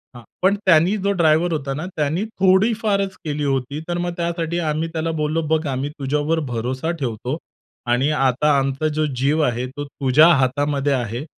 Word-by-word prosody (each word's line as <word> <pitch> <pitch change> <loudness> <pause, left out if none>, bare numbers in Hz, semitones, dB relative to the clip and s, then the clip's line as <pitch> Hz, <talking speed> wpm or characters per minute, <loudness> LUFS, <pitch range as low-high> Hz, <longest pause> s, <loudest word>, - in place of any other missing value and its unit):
हां, 120 - -11 0.2
पण 190 +2 +4
त्यानी 175 +2 +4
जो 200 +1 0
ड्रायव्हर 170 -1 +3
होता 140 -3 -2
ना, 155 +5 -4
त्याने 155 +6 0 0.2
थोडीफारच 195 0 +2
केली 150 -1 -2
होती. 135 +1 -1
तर 175 0 -2
मग 175 0 -2
त्यासाठी 170 0 -2
आम्ही 155 +2 -1
त्याला 165 0 -1
बोललो, 155 +2 0
"बघ, 160 0 +1
आम्ही 135 +1 -2
तुझ्यावर 150 +4 0
भरोसा 130 +7 -2
ठेवतो 125 +3 -3 0.5
आणि 130 +4 +2
आता 140 +1 +2
आमचा 135 +3 0
जो 155 - +2
जीव 140 +5 +1
आहे, 125 -2 0
तो 145 +3 -7
तुझ्या 140 +2 +4
हातामध्ये 140 +2 +1
आहे, 120 0 -2
150 Hz, 170 wpm, -21 LUFS, 135-165 Hz, 0.5 s, पण